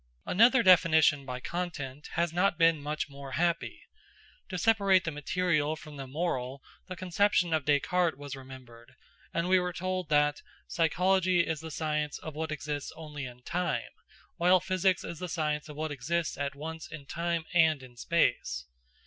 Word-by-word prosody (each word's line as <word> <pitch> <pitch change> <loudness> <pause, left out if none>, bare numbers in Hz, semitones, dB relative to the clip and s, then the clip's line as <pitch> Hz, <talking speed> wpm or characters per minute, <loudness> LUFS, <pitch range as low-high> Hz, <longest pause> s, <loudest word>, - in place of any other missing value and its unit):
Another 235 +5 +5
definition 160 -6 +5
by 125 0 -4
content 150 -3 -5
has 170 0 0
not 180 +1 +2
been 165 -3 +4
much 150 +1 -3
more 140 -1 -9
happy. 170 +1 -1 0.7
To 185 - -3
separate 200 -3 +4
the 165 - -2
material 155 0 0
from 155 -1 -11
the 135 -1 -6
moral, 135 -3 -3 0.2
the 185 - -6
conception 180 -1 +1
of 155 -3 0
Descartes 155 +2 +2
was 145 -1 -7
remembered, 130 -2 -13 0.4
and 170 +1 -1
we 185 0 +5
were 180 0 -2
told 185 -1 -3
that: 150 -1 +2 0.3
"Psychology 180 +2 +2
is 160 -2 -2
the 160 +1 -7
science 150 -1 -2
of 155 - -8
what 160 +1 -4
exists 150 -1 -4
only 150 -3 -7
in 125 -1 -11
time, 170 -8 -2 0.5
while 180 +2 +5
physics 185 0 +1
is 165 - -6
the 180 - -5
science 150 -2 -2
of 150 - -8
what 155 +1 -3
exists 155 +4 -2
at 140 0 -3
once 160 +2 -6
in 155 -3 -8
time 170 +2 -2
and 160 -5 +4
in 125 -1 -14
space." 120 - 0
160 Hz, 165 wpm, -30 LUFS, 145-175 Hz, 0.7 s, Another